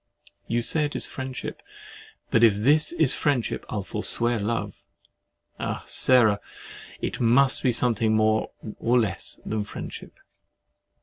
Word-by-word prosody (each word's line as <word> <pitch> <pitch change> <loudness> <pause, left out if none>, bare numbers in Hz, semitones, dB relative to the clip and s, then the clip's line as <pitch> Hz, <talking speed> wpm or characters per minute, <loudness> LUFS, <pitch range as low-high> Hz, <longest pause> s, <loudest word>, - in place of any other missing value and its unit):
You 120 +1 0
say 150 +4 +1
it 145 - -5
is - - -2
friendship—but 130 -3 -6
if 110 -3 +6
this 145 +9 +2
is 160 -6 +3
friendship, 140 -6 -1
I'll 105 -2 -3
forswear 115 +3 0
love. 105 -2 -3 0.8
Ah! - - -4
Sarah! 110 -6 +4 0.6
it - - -3
must 130 +3 +4
be 125 - +2
something 115 -2 +1
more 110 0 +1 0.3
or 120 +2 +2
less 100 -6 -3
than 110 -1 -2
friendship. 105 - -9
115 Hz, 125 wpm, -25 LUFS, 110-130 Hz, 0.8 s, if